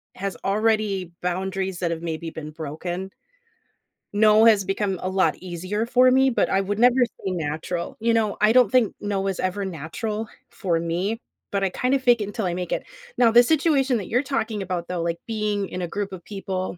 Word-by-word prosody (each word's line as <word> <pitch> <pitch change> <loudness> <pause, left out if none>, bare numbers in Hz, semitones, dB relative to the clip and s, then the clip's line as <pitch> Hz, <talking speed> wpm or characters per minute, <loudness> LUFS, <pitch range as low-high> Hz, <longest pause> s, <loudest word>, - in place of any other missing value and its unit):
has 195 -2 -4
already 205 -3 +1
boundaries 190 +1 -2
that 170 -2 -1
have 165 0 -3
maybe 165 0 -4
been 155 -1 -7
broken 175 +5 -5 1.0
"no" 215 +1 +5
has 210 -4 +5
become 195 -1 -1
a 185 - -2
lot 190 0 +2
easier 185 +5 -3
for 255 +1 +5
me, 265 +1 +5
but 235 - +1
I 195 - +2
would 200 +1 -2
never 245 +1 +6
say 190 -4 -6
natural. 170 +1 -3
You 230 0 +2
know, 215 -3 +1
I 215 +1 +5
don't 250 -4 +5
think 250 -5 +3
"no" 195 -1 -2
is 190 - -2
ever 185 +2 -1
natural 210 - -4 0.2
for 170 -4 -1
me, 180 +7 -2 0.3
but 200 -1 0
I 190 - +2
kind 250 +8 -1
of 270 - +1
fake 240 -2 +5
it - - -1
until 205 -1 -3
I 175 - 0
make 180 0 -4
it. - - -2 0.3
Now 230 -2 +5
the 240 +1 +8
situation 275 -3 +2
that 200 - -5
you're 250 +5 +2
talking 225 -6 -2
about 180 -3 -3
though, 180 -2 -2
like, 170 0 -2
being 210 -3 -1
in 180 - -5
a 175 - -2
group 200 +2 -4
of 185 -2 -8
people, 190 -3 -4
195 Hz, 210 wpm, -24 LUFS, 180-225 Hz, 1.0 s, the